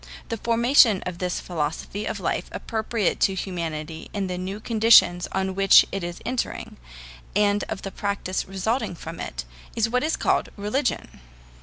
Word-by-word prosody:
The 230 - -2
formation 235 -1 +4
of 180 -1 -5
this 180 -1 -1
philosophy 165 +5 -3
of - - -3
life - - -1
appropriate 220 -3 -1
to 195 - +2
humanity 165 -4 -5
in 200 -1 -1
the 180 -1 -3
new 190 +3 -4
conditions 215 -6 +5
on 190 0 -1
which 195 +1 +7
it 195 -2 -3
is 175 0 -6
entering, 255 -1 -3 0.6
and 205 0 +3
of 220 -3 -5
the 195 - -5
practice 200 -1 -3
resulting 195 +3 -1
from 165 0 -8
it, - - -5 0.3
is 225 0 +1
what 250 +2 +1
is 315 - 0
called - - +1
religion. 210 - -2
195 Hz, 160 wpm, -24 LUFS, 180-225 Hz, 0.6 s, which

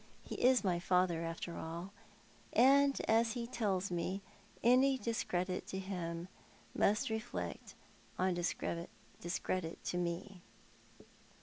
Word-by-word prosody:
He - - -7
is 255 -1 +5
my 180 -3 +1
father, 180 -2 +2
after 165 +1 -4
all; 170 +4 -5 0.6
and, 275 +2 +5
as 225 0 +4
he 240 -2 -3
tells 200 -6 -1
me, 185 +3 -2 0.4
any 260 +3 +5
discredit 185 -6 -2
to 190 - -4
him 175 -3 -4 0.5
must 210 +2 +2
reflect 90 - -4 0.4
discredit 175 -2 -1 0.3
upon 175 0 -2
me. 175 +2 -4
185 Hz, 105 wpm, -35 LUFS, 170-225 Hz, 0.6 s, is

